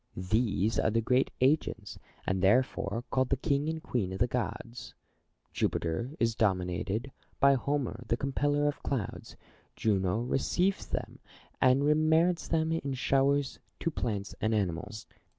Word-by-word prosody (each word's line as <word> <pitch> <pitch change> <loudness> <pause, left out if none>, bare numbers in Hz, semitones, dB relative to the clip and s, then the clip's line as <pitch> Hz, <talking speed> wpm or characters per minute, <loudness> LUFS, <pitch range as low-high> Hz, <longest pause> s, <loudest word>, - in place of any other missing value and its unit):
These 105 +2 +1
are - - +2
the 115 +1 +1
great 125 +3 +2
agents, 130 -6 +1 0.3
and 95 0 0
therefore 115 +1 +2
called 130 -1 +1
the 135 - +1
king 140 +3 0
and 160 0 -4
queen 115 - -1
of 95 - -4
the 120 - +3
gods. 115 0 -4 0.6
Jupiter 115 - -1
is 115 -1 +2
denominated 100 +4 -1 0.3
by 140 0 +6
Homer 135 -3 -1
the 115 - +1
compeller 145 +2 +1
of 145 - -2
clouds: 130 -7 -4 0.4
Juno 100 0 +1
receives 175 +10 0
them, - - -5 0.4
and 130 +2 +4
remits 160 +3 +3
them 160 -1 +1
in 140 -5 -2
showers 135 +2 +1 0.2
to 165 - -1
plants 105 -8 -3
and 110 0 +1
animals. 105 +2 -2
125 Hz, 140 wpm, -30 LUFS, 105-140 Hz, 0.6 s, by